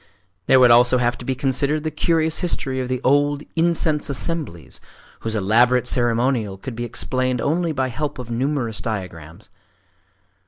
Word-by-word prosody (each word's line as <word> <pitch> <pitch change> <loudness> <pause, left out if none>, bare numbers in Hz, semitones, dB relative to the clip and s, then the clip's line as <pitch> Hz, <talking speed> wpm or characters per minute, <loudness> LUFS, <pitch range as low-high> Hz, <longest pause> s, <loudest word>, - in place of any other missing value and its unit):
There 130 - +6
would 125 -2 +6
also 120 +2 +5
have 120 -1 0
to 120 - -9
be 130 - -1
considered 140 +3 0
the 155 - -2
curious 160 +1 +1
history 135 -6 -2
of 125 -1 -4
the 130 -1 -2
old 145 +2 +2
"incense 165 -3 +1
assemblies," 140 - -3 0.4
whose 110 -1 -4
elaborate 120 +5 +2
ceremonial 120 -4 +1
could 115 +5 -8
be 120 +1 -4
explained 130 +1 -1
only 165 +6 0
by 135 -3 -1
help 145 +4 -4
of 125 -2 -8
numerous 125 -2 -2
diagrams. 85 -7 -7
130 Hz, 155 wpm, -21 LUFS, 120-145 Hz, 0.4 s, There